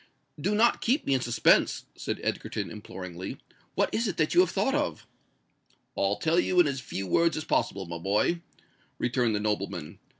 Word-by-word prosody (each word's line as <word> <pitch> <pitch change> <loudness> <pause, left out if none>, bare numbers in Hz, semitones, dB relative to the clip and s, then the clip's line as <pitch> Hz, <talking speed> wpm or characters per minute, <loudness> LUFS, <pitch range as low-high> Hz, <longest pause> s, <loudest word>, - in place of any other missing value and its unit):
"Do 200 +7 +1
not 235 +3 +3
keep 255 +6 +1
me 140 - +2
in 130 - +2
suspense," 120 -1 +3
said - - -4
Egerton, - - -3
imploringly: 95 -3 -7 0.4
"what - - +1
is 230 +1 +1
it 190 - -3
that 155 -1 +1
you - - +5
have 180 -1 +5
thought 200 +9 0
of?" 295 0 -1 0.9
"I'll 100 +1 +1
tell 160 +11 +2
you 180 0 +2
in 175 - +7
as 140 -2 -1
few 95 -5 -5
words 165 - +2
as 155 - -3
possible 95 -1 0
my 85 0 -6
boy," 105 - +1 0.6
returned 120 -3 +1
the - - 0
nobleman. 105 -7 -3
130 Hz, 180 wpm, -28 LUFS, -, 0.9 s, in